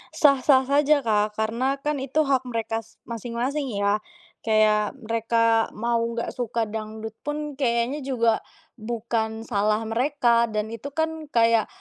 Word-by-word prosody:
Sah-sah 275 -2 +5
saja, 285 +2 +3
Kak, 210 -2 +1
karena 230 +5 0
kan 295 -1 -1
itu 275 +4 +1
hak 265 -3 +1
mereka 225 -2 -2
s 225 0 -16
masing-masing 245 +5 -3
ya, 200 +1 +1 0.4
kayak 215 0 +2
mereka 230 0 +2
mau 235 +2 0
nggak 230 0 -2
suka 235 -1 -2
dangdut 220 0 -5
pun 295 -1 -5
kayaknya 240 +2 +1
juga 235 -5 +1 0.4
bukan 225 0 -2
salah 215 -1 0
mereka, 235 0 +2
dan 215 0 -3
itu 230 +4 -6
kan 320 -1 -2
kayak 230 -4 +3
230 Hz, 135 wpm, -24 LUFS, 220-270 Hz, 0.4 s, Sah-sah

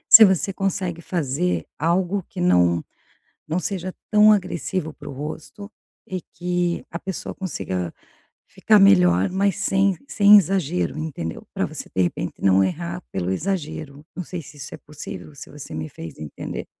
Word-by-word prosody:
se 225 - +12
você 190 -1 +3
consegue 185 -3 -2
fazer 170 0 -1
algo 180 +4 +1
que 190 - -8
não 90 - +3 0.6
não 160 +3 0
seja 185 0 -3 0.2
tão 210 0 +7
agressivo 185 -4 0
para 145 - -11
o - - -7
rosto, 160 +9 -7 0.4
e 185 -1 -4
que 175 -1 -1
a 170 - -4
pessoa 190 0 -5
consiga 95 - -3 0.6
ficar - - +3
melhor, 90 -2 +5
mas 195 0 +1
sem 195 -1 +2
sem 205 -3 +7
exagero, 180 -4 0
entendeu? 150 - -5
Pra - - 0
você - - -4
de 95 - +3
repente 90 0 -2
não 95 0 +5
errar 170 - -3
pelo 90 -1 -2
exagero. 155 - -3
Não 180 - -4
sei 175 +1 -6
se 145 0 -14
isso 140 0 -8
é - - -7
possível, 150 0 -9
se 140 - -10
você 145 - -9
me 80 0 -4
fez 80 +1 -9
entender. 75 -1 -6
170 Hz, 160 wpm, -23 LUFS, 135-190 Hz, 0.6 s, se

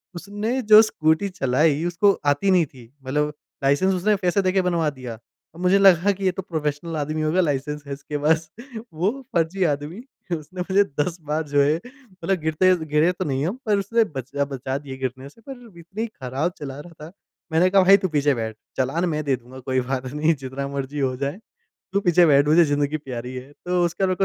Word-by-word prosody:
उसने 205 +8 -3
जो 215 -1 +8
स्कूटी 160 -2 +1
चलाई, 150 -1 +1
उसको 175 +4 +3
आती 145 +7 +2
नहीं 180 -3 +4
थी 125 -4 -16
मतलब 150 +3 -1 0.3
लाइसेंस 145 +8 +3
उसने 205 +4 +2
पैसे 190 0 +1
दे 185 -1 +1
के 190 0 +2
बनवा 170 -4 +1
दिया। 130 -5 -8 0.4
मुझे 180 +2 +3
लगा 195 0 +5
कि 195 0 -4
ये 185 - +3
तो 190 - -5
प्रोफेशनल 160 -2 -3
आदमी 155 +1 -2
होगा 155 +4 +2
लाइसेंस 150 -1 -2
है 140 - -4
इसके 145 +1 -5
पास। 155 +2 +1 0.4
वो 180 +7 +1 0.2
फ़र्ज़ी 170 +3 +1
आदमी 145 +8 -5 0.3
उसने 175 +4 -7
पहले 190 +2 +3 0.2
10 170 +3 -2
बार 155 +1 0
जो 145 0 +3
है 145 +2 +3
मतलब 220 -8 -5
गिरते 160 +4 +3
गिरे 155 +3 +2
तो 180 +1 -4
नहीं 135 0 -1
हम 210 - -3
पर 210 -2 +2
उसने 230 +4 +2
बच 130 0 -5 0.2
बचा 130 0 -3
दिए 135 -2 -8
गिरने 130 +1 -5
से। 230 - -22
पर 245 -3 -9
इतनी 195 +7 -5
खराब 140 - -3
चला 140 -1 -6
रहा 170 +3 -11
था, 165 - -11 0.4
मैंने 170 +3 +4
कहा 195 +1 +5
भाई 195 +2 +7
तू 190 - -1
पीछे 145 -2 +2
बैठ, 110 -1 -4 0.2
चालान 135 +7 0
मैं 155 -1 -2
दे 140 -2 +1
दूँगा, 125 +2 -13
कोई 130 +1 -1
बात 130 -1 -2
नहीं, 155 +2 +2
जितना 135 +1 -5
मर्ज़ी 140 +1 -4
हो 130 -2 0
जाए, 140 +7 -3 0.5
तू 200 - +2
पीछे 175 -2 +4
बैठ 145 -1 +5
मुझे 170 +2 +6
ज़िंदगी 145 0 0
प्यारी 125 -3 -7
है, 130 +3 -8
तो 180 +3 -1
उसके 170 +3 -2
बाद 190 - +2
मेरे 185 - 0
155 Hz, 210 wpm, -23 LUFS, 140-185 Hz, 0.5 s, जो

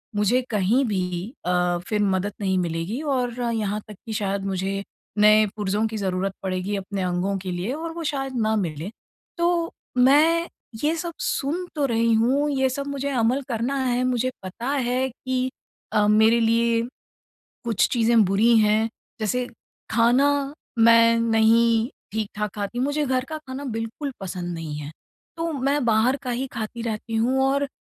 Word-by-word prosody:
मुझे 210 +5 +2
कहीं 215 +5 +2
भी 185 0 -2
अ, 180 0 +1
फिर 210 -1 0
मदद 195 0 0
नहीं 190 -2 +1
मिलेगी, 175 - -2
और 250 -5 -1
यहाँ 210 -1 -1
तक 210 - -10
कि 225 - -5
शायद 200 -1 -2
मुझे 195 +1 -2 0.3
नए 215 +1 +6
पुर्ज़ों 210 +1 0
की 220 0 -5
ज़रूरत 190 -1 -1
पड़ेगी 185 +2 -2
अपने 195 0 -4
अंगों 180 +2 0
के 185 -1 -5
लिए 180 +6 -3
और 325 +3 -4
वो 335 0 -5
शायद 270 -1 -3
ना 220 0 +2
मिले। 170 -4 -2 0.5
तो 340 -1 +1 0.3
मैं 310 +7 +5 0.4
ये 310 +2 +2
सब 335 0 -4
सुन 320 +7 -1
तो 290 -2 +1
रही 230 -2 +2
हूँ, 260 +7 +2
ये 265 -1 +2
सब 280 +2 -4
मुझे 280 0 -3
अमल 250 0 +1
करना 240 +3 -1
है। 250 0 +1
मुझे 255 0 0
पता 220 +7 -5
है 260 -1 0
कि 255 +1 -2 0.4
अ, 210 -1 +3
मेरे 220 +2 +5
लिए 230 0 +2 0.8
कुछ 230 -5 +2
चीज़ें 230 -2 +4
बुरी 210 +5 +4
हैं। 215 +1 +3 0.3
जैसे 245 +3 -1 0.4
खाना 240 +4 +4 0.5
मैं 230 0 +6
नहीं 230 0 +3 0.2
ठीक-ठाक 210 -1 -3
खाती, 205 +3 -3
मुझे 290 +3 0
घर 255 -1 0
का 315 - -3
खाना 270 -2 -7
बिल्कुल 225 +5 -4
पसंद 180 -2 -5
नहीं 165 -3 -5
है। 150 0 -7 0.5
तो 330 0 -1
मैं 280 +1 0
बाहर 230 +3 +3
का 255 - -5
ही 245 +2 -2
खाती 225 +1 -5
रहती 225 0 -4
हूँ 245 +4 +2
और 280 +1 +1
230 Hz, 165 wpm, -24 LUFS, 200-260 Hz, 0.8 s, नए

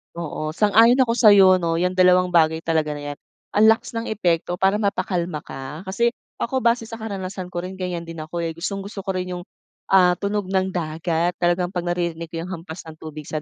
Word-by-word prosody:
Oo, 155 -2 -4
sang-ayon 225 +6 +5
ako 235 -3 +2
sa 215 -4 +7
'yo 190 -2 +7
'no. 170 -2 -1
'Yang 180 +2 0
dalawang 180 0 +5
bagay 160 -2 +3
talaga 160 -2 0
na 145 - -7
yan, - - -18 0.3
ang 210 +2 +4
lakas 225 +1 +3
ng 230 - -3
epekto 175 -6 0
para 195 +2 +3
mapakalma 180 -6 -1
ka. 135 +5 -8
Kasi 235 +5 +1 0.2
ako, 260 +2 -1
base 235 0 +2
sa 225 0 -9
karanasan 190 -3 -5
ko 175 0 -4
rin, 185 - -6
ganyan 180 -2 -4
din 165 -1 -7
ako 155 +2 -7
eh. 165 - -3
Gustong-gusto 195 +3 -5
ko 195 - -8
rin 180 0 -3
'yong, 180 - -5 0.5
ah, 180 -2 +6
tunog 205 0 -1
ng 190 0 +1
dagat. 165 0 -1
Talagang 175 +1 +1
'pag 175 -2 -2
naririnig 170 -2 -2
ko 165 - -6
'yong 185 - -6
hampas 165 -1 -9
ng 160 - -9
tubig 155 -1 -8
sa 155 +1 -4
180 Hz, 210 wpm, -22 LUFS, 165-200 Hz, 0.5 s, sa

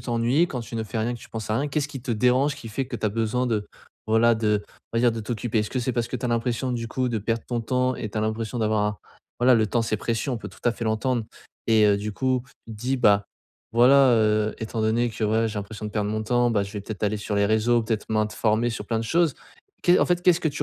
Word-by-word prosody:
t'ennuies, 120 +7 +1
quand 130 - -4
tu 115 - -9
ne 115 - -1
fais 110 +1 -5
rien, 115 +3 -1
que 120 - -10
tu - - -13
penses 110 -1 -5
à - - +1
rien, 145 +2 -1
qu'est-ce 145 0 -1
qui 135 -4 -8
te 130 - -4
dérange, 125 +5 +2
qui 120 - -10
fait 130 +4 -3
que 120 - -4
tu 110 - -1
as - - +2
besoin 115 +4 -1
de, 110 -4 -1 0.4
voilà, 115 +1 +4
de, 105 -2 0 0.3
on - - -2
va - - +2
dire, 120 -1 +4
de 115 - -4
t'occuper? 110 0 -1
Est-ce 105 - -4
que 130 - -2
c'est 125 +1 -1
parce 120 -1 -1
que - - -3
tu 125 - -7
as - - -2
l'impression, 120 +2 -1
du 115 -1 -3
coup, 130 +1 -1
de 115 -2 -1
perdre 115 +2 -2
ton 120 -1 -2
temps 125 +2 0
et 110 - -5
tu 110 - -3
as - - 0
l'impression 110 +2 -2
d'avoir 110 -1 +1
un 105 0 -1 0.4
voilà, 125 +1 +6
le 110 - +2
temps, 115 +3 +1
c'est 110 -1 -1
précieux, 115 +5 -2
on 120 - -2
peut 105 -1 -7
tout - - -17
à 120 - +4
fait 115 0 -6
l'entendre. 115 +3 0 0.5
Et, 110 -2 +5
heu, 100 -1 +4
du 105 +1 -4
coup, 130 +2 0 0.2
tu 115 - -8
te - - -12
dis 130 +3 0
bah: 100 -4 +4 0.5
«Voilà, 130 +3 +6
heu, 110 -1 +2
étant 110 0 -4
donné 115 +2 +2
que, 110 - -3
ouais, 110 +2 +2
j'ai 110 - -6
l'impression 105 +1 -7
de - - -5
perdre 105 -1 -1
mon 110 0 -2
temps, 120 +2 +2
bah, 105 -3 +2
je 100 - -6
vais 105 - -4
peut-être 105 +1 -7
aller 105 +1 0
sur 105 0 -4
les 100 0 +3
réseaux, 110 +3 +2
peut-être 110 -1 -2
m'informer 110 +1 +1
sur 105 -2 -5
plein 115 - 0
de - - -4
choses». 165 +5 +2 0.5
Qu'est 175 +1 +5
en - - +4
fait, 175 0 +1
qu'est-ce 180 -1 +4
que - - -1
tu 145 0 -3
115 Hz, 290 wpm, -25 LUFS, 110-125 Hz, 0.5 s, voilà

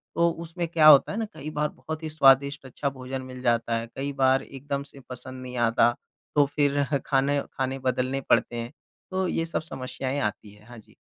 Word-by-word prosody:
तो 170 0 +4
उसमें 170 +1 -4
क्या 160 -2 +4
होता 145 -3 +8
है 210 - -4
ना, 225 - -1
कई 155 0 -7
बार 150 0 0
बहुत 160 0 -7
ही 155 - -3
स्वादिष्ट 140 -1 +4
अच्छा 140 +2 -3
भोजन 130 0 -6
मिल 130 0 -9
जाता 115 -2 +1
है, 115 0 -4
कई 140 +1 -3
बार 135 -1 +3
एकदम 140 +1 -5
से 140 -1 -15
पसंद 130 +1 -8
नहीं 125 -1 -7
आता 115 0 +4 0.4
तो 145 -1 +6
फिर 145 -1 +2 0.2
खाने 140 +1 +2
खाने 130 0 -2
बदलने 130 +1 -1
पड़ते 120 - +3
हैं। 115 +2 -4 0.4
तो 185 0 0
ये 165 -1 -1
सब 165 - -2
समस्याएँ 130 -1 -4
आती 105 -1 -3
हैं। 105 +2 -19
हाँ 120 - -11
जी। 110 - -20
135 Hz, 205 wpm, -26 LUFS, 125-150 Hz, 0.4 s, होता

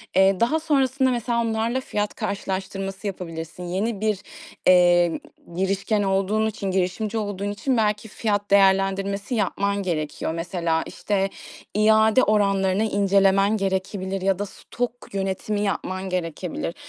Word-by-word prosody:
Eee, 190 0 +4
daha 280 +8 +2
sonrasında, 270 -4 +2
mesela, 235 0 0
onlarla 230 +2 0
fiyat 210 -4 -2
karşılaştırması 195 -1 -4
yapabilirsin. 170 -2 -6
Yeni 195 +4 -2
bir, 215 -3 +1 0.5
eee, 175 -2 +5 0.4
girişken 195 +3 0
olduğun 195 +3 +1
için, 200 -3 -3
girişimci 190 +4 -1
olduğun 205 -1 -3
için 250 +5 -1
belki 210 0 0
fiyat 205 -2 -2
değerlendirmesi 195 +2 +2
yapman 200 -1 0
gerekiyor. 160 -2 -2
Mesela, 165 -1 -1
işte, 195 -1 -1 0.4
iade 220 +3 +4
oranlarını 195 -1 +2
incelemen 200 0 +3
gerekebilir 190 0 -2
ya 195 -1 +1
da 205 - -1
stok 240 +4 -4 0.2
yönetimi 195 +2 -2
yapman 190 -2 -2
gerekebilir. 170 -1 -3
195 Hz, 120 wpm, -24 LUFS, 190-215 Hz, 0.5 s, eee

